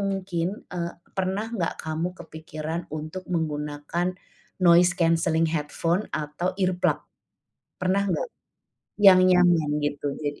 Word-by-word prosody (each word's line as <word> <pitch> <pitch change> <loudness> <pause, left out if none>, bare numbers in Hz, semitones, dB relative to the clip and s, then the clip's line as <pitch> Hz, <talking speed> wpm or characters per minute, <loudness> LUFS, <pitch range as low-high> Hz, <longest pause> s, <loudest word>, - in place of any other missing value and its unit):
mungkin, 190 -4 -1 0.3
eee, 170 -1 -2 0.2
pernah 190 +3 -1
nggak 175 -7 -1
kamu 160 +2 -2
kepikiran 160 0 -6 0.2
untuk 155 +5 -6
menggunakan 150 +1 -2 0.6
noise 175 0 +7
cancelling 165 -1 +2
headphone 165 +4 0 0.2
atau 150 +5 -3
earplug? 185 -2 +1 0.8
Pernah 185 +2 +2
nggak? 185 - 0 0.8
Yang 185 -1 +10
nyaman 175 -4 +4 0.2
gitu 145 0 -3 0.2
jadi. 145 -1 -3
170 Hz, 110 wpm, -25 LUFS, 155-185 Hz, 0.8 s, Yang